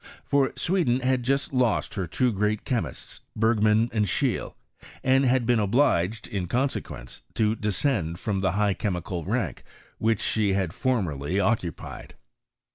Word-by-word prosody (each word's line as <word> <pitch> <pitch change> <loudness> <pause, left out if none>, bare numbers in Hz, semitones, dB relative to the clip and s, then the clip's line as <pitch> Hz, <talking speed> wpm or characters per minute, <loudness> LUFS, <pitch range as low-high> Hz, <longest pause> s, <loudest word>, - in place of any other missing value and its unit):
For 140 -1 +2
Sweden 165 -9 +1
had 130 0 +1
just 135 +3 0
lost 125 0 +1
her 95 -7 -3
two 125 +9 +1
great 105 +1 -1
chemists, 95 - -3
Bergman 110 0 +3
and 105 -2 +1
Schceie, - - -1 0.5
and 135 +1 +4
had 125 -1 +2
been 120 -1 +3
obliged, 105 -2 +2
in 95 -4 -3
consequence, 130 +6 -3
to 110 -1 +2
descend 105 - -1
from 100 +1 -2
the 95 - +1
high 105 0 +2
chemical 90 -4 -3
rank - - -2 0.4
which 110 -1 +2
she 105 -3 +1
had 95 -4 -1
formerly 95 - -1
occupied. 100 -6 -2
110 Hz, 140 wpm, -26 LUFS, 95-125 Hz, 0.5 s, and